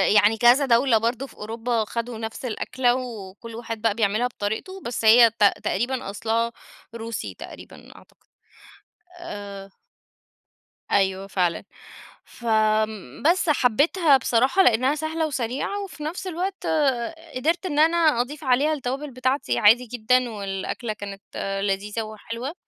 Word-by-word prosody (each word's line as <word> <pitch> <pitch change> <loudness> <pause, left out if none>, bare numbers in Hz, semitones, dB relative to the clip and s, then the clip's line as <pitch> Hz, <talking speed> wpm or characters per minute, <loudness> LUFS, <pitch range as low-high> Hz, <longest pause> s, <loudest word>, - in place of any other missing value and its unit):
يعني 210 +2 +5
كذا 245 +5 +5
دولة 240 -1 +4
برضو 235 +4 -1
في - - -17
أوروبا 225 +1 -2
خدوا 235 +1 -4
نفس 225 +3 -6
الأكلة 245 +1 0
وكُلّ 225 -3 -7
واحد 225 -2 -6
بقى 225 -2 +2
بيعملها 220 +2 +1
بطريقته، 245 - -5
بس 235 -1 -4
هي 230 +1 +8
ت - - +3 0.2
تقريبًا 240 +1 -1
أصلها 225 +3 -1 0.4
روسي 230 0 -5
تقريبًا - - -12
أعتقد، - - -20 1.0
آآ 200 - -8 1.2
أيوه 190 0 +1
فعلًا، 180 -4 0 0.6
فآمم، 215 - -1
بس 360 -2 0
حبيتها 290 - +4
بصراحة 260 +9 +3
لإنها 255 +2 +3
سهلة 315 +1 -2
وسريعة 270 - -3
وفي 365 -6 -9
نَفس 340 +5 -4
الوقت 370 +2 -3 0.7
قدرت 330 +8 0
إن 300 -4 -1
أنا 330 +2 +4 0.2
أضيف 290 +4 -6
عليها 275 +4 +2
التوابل 275 +1 -4
بتاعتي 255 +3 -1
عادي 225 +4 +5
جدًا، 245 +1 +1
والأكلة 205 +2 -4
كانت 200 -1 -8 0.4
لذيذة 205 +3 -2
وحلوة. 230 +5 -6
235 Hz, 125 wpm, -24 LUFS, 215-275 Hz, 1.2 s, هي